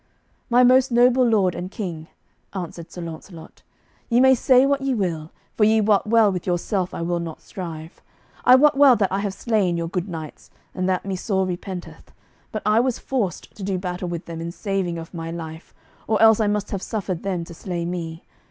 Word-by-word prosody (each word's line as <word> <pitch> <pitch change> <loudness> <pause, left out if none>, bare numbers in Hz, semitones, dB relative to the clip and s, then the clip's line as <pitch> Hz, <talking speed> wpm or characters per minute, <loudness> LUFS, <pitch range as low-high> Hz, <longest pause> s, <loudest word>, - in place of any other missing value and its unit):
"My 245 +1 +5
most 255 +1 +5
noble 250 +2 +5
lord 210 -7 +3
and 180 +2 -5
king," 170 -6 -6 0.5
answered 170 -2 -6
Sir 175 - -8
Launcelot, 165 0 -10 0.5
"ye 235 0 +3
may 265 +1 +7
say 255 +1 +4
what 280 0 +1
ye 270 -1 0
will, 165 -7 -2 0.3
for 215 - +2
ye 220 +1 +5
wot 210 -1 +2
well 225 -2 +4
with 180 -1 -5
yourself 180 +1 -1
I - - -4
will 175 0 -1
not 165 -2 -6
strive. 165 -3 -8 0.4
I 250 - +8
wot 295 +2 +5
well 275 -2 +7
that 200 -4 0
I 195 - 0
have 200 -1 -3
slain 200 -7 0
your 170 0 -2
good 180 +2 -3
knights, 160 -3 -8 0.2
and 185 0 -1
that 185 0 0
me 195 -1 -2
sore 190 0 0
repenteth; 180 0 -7 0.4
but 215 - -4
I 215 +1 +4
was 250 0 +1
forced 225 -10 -3
to - - -12
do 190 -1 -1
battle 180 0 -4
with 170 -1 -5
them 165 -1 -7
in 170 +1 -4
saving 190 -3 -2
of 165 +2 -9
my 165 -1 -5
life, 165 -1 -8 0.4
or 215 -1 +1
else 220 -1 +6
I 215 - +2
must 210 0 -1
have 195 - -3
suffered 190 -6 -3
them 185 -3 -2
to 170 - -10
slay 170 0 -4
me. 170 -1 -5
190 Hz, 210 wpm, -23 LUFS, 170-220 Hz, 0.5 s, I